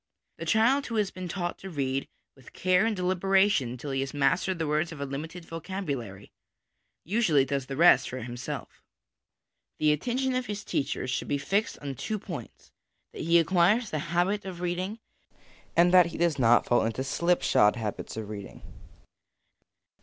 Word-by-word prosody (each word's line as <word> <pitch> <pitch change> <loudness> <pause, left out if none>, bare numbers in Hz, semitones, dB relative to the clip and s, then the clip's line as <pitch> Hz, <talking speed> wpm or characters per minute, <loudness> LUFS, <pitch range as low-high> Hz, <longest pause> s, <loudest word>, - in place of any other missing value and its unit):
The - - -5
child 250 +6 +3
who 230 - -4
has 210 -3 +1
been 185 -1 -6
taught 175 0 -3
to 195 - -8
read 135 -4 -2 0.3
with 135 -2 -17
care 185 +3 +2
and 225 - 0
deliberation 190 - +2
until 125 +4 -6
he 135 - -1
has 135 +2 -3
mastered 170 +6 +1
the 165 - -1
words 155 +2 0
of 155 - -9
a 140 - -2
limited 160 +5 -6
vocabulary, 145 - -5 0.7
usually 170 - +3
does 135 -2 -2
the 135 - -5
rest 160 -6 +6
for 130 - -5
himself. 120 0 -6 1.0
The 155 0 +3
attention 255 - 0
of 255 -1 -1
his 205 0 -4
teachers 130 -2 -2
should - - -2
be 145 - 0
fixed 200 +9 -1
on 140 -1 -3
two 215 - -3
points 205 - -9 0.4
that - - -7
he 170 +2 +4
acquires 185 +7 +3
the 155 - -1
habit 185 +5 +1
of 185 -3 -7
reading, 180 +4 -2 0.8
and 175 +1 +5
that 180 -2 +7
he 170 - -7
does 170 -4 +1
not 120 -1 +5
fall 120 - +3
into 115 +4 -2
slipshod 155 -8 +2
habits 110 -1 -5
of 110 -2 -5
reading. 100 -2 -9
170 Hz, 170 wpm, -28 LUFS, 135-190 Hz, 1.0 s, that